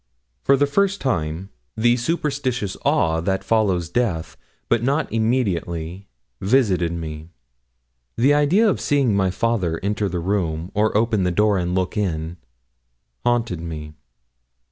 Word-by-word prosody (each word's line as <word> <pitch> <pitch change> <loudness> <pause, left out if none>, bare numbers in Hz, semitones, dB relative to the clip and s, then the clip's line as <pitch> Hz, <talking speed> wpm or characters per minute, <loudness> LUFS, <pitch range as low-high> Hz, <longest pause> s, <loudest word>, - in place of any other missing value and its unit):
For 140 - +4
the 145 - +3
first 200 +6 +1
time 85 - -2 0.3
the 120 +2 +4
superstitious 130 - -2
awe 80 0 +2
that 95 +3 -1
follows 100 -6 +1
death, 90 -5 -1 0.3
but 120 -2 +2
not 140 +4 0
immediately, 95 -6 -1 0.3
visited 95 -6 +2
me. 80 -1 -6 0.9
The 135 +5 +4
idea 155 +10 +4
of 200 - +1
seeing 135 -7 +2
my 95 -1 +2
father 95 -6 0
enter 105 0 0
the 90 - -3
room, 85 -2 -2
or 105 0 +2
open 110 -2 +1
the 90 - +2
door 105 +2 +2
and 90 0 -1
look 95 +3 -1
in, 85 -4 -2 0.9
haunted 115 -8 0
me. 75 -2 -6
100 Hz, 135 wpm, -22 LUFS, 85-120 Hz, 0.9 s, For